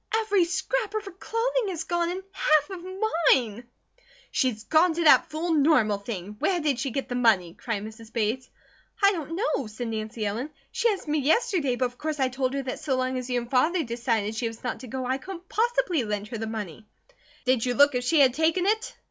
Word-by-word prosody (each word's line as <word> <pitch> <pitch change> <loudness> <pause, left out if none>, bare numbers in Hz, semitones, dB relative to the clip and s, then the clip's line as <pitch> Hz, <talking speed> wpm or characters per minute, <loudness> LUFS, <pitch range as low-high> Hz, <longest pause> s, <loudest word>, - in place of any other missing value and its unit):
"Every 410 -5 +2
scrap 430 +5 -2
of 430 0 -2
her 395 - -7
clothing 455 +4 -1
is 345 -4 -3
gone, 345 -1 0
and 370 +2 -4
half 305 -5 +2
of 365 -2 -7 0.5
mine!" 235 -1 -4 0.6
"She's 240 -6 0
gone 320 +5 +3
to 340 - 0
that 310 - +6
fool 325 +3 -2
Normal 280 -9 +3
thing! 200 -1 -6
Where 370 -2 +1
did 295 -5 0
she 270 +1 -1
get 270 +2 -3
the - - -4
money?" 215 -9 +3
cried 215 -2 -4
Mrs. 220 +1 -10
Bates. 230 +3 -1 0.5
"I 400 - +7
don't 330 -4 -4
know!" 360 - -1
said 225 +3 -5
Nancy 220 0 -4
Ellen. 225 +8 -2 0.2
"She 475 - +2
asked 395 -6 -3
me 300 +1 +1
yesterday, 300 - +2
but 255 - 0
of 245 0 -6
course 310 -1 -3
I 260 -1 +2
told 260 +1 -1
her 275 - -2
that 255 - -4
so 270 -4 -1
long 255 0 -1
as 250 0 -7
you 245 -1 +1
and 240 0 -8
Father 320 +7 +3
decided 230 -3 -1
she 230 +1 -2
was 225 0 -9
not 245 -2 -3
to 255 - -9
go, 260 +2 -4
I 260 +2 -1
couldn't 365 +3 -9
possibly 460 - +1
lend 210 -1 -3
her 230 - -5
the 225 - -3
money." 215 -2 -6 0.6
"Did 255 -2 +2
you 245 -1 0
look 285 +1 +6
if 250 0 -1
she 300 +4 +4
had 260 -3 +5
taken 325 +5 +1
it?" 440 +3 0
265 Hz, 225 wpm, -26 LUFS, 230-345 Hz, 0.6 s, I